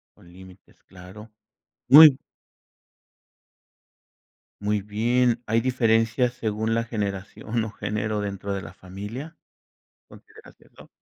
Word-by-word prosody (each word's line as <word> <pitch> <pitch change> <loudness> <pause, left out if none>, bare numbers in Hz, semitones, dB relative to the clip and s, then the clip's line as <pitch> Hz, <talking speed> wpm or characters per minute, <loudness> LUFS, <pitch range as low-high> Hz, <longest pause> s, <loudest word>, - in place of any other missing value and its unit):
Con 85 - -20
límites, 95 +1 -17
claro. 95 +4 -14 0.6
Muy 145 0 +9 2.5
Muy 105 -1 -1
bien, 120 +3 0
¿hay 115 +1 +2
diferencias 120 0 +1
según 110 -1 -2
la 115 - 0
generación, 105 +1 -4
o 110 - -7
género 105 0 -3
dentro 100 0 -5
de 100 - -4
la 85 +1 -11
familia? 105 - -9 0.7
¿Consideras 440 +1 -17
eso? - - -19
110 Hz, 105 wpm, -24 LUFS, 100-120 Hz, 2.5 s, Muy